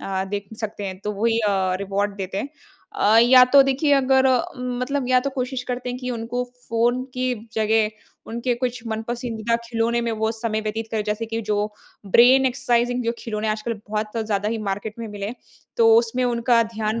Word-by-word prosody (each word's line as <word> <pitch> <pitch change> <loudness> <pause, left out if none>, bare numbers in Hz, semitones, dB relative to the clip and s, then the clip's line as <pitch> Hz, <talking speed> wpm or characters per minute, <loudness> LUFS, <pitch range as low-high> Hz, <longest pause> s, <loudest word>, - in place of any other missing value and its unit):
अ, 190 -1 -2
देख 200 -1 -4
सकते 210 -2 -4
हैं, 185 -1 -6
तो 210 - -1
वही 230 -1 +3
अ, 190 -3 +1
रिवार्ड 200 +1 -2
देते 195 0 -4
हैं। 275 - -3 0.5
अ, 215 +2 +4
या 250 +1 +8
तो 275 +2 +6
देखिए 275 +2 +1
अगर 265 -1 +3 0.3
म 250 -1 -4
मतलब 265 0 -2
या 255 0 +5
तो 275 +2 -2
कोशिश 255 -1 -3
करते 250 0 -3
हैं 250 - -5
कि 250 -1 -4
उनको 240 +1 -3 0.2
फ़ोन 240 +3 +1
की 255 0 0 0.2
जगह 220 0 +2 0.4
उनके 235 +2 -1
कुछ 250 0 -3
मन-पसंदीदा 230 0 -3
खिलौने 230 0 0
में 235 - -1
वो 220 0 0
समय 220 -1 -2
व्यतीत 220 +1 -4
करें। 220 -2 -1
जैसे 210 +2 -2
कि 225 +1 -3
जो 210 0 -1 0.5
ब्रेन 255 +6 +6
एक्सरसाइज़िंग 245 -1 +1
जो 230 - +1
खिलौने 215 -1 -3
आजकल 215 +2 -2 0.2
बहुत 215 +1 -3
ज़्यादा 210 -1 0
ही 225 0 -2
मार्केट 205 +2 -3
में 230 - -5
मिले 205 -1 -5
हैं। 225 - -5 0.4
तो 225 -1 +6
उसमें 240 +2 +1
उनका 235 -1 +3
ध्यान 220 0 -3
230 Hz, 195 wpm, -22 LUFS, 215-250 Hz, 0.5 s, या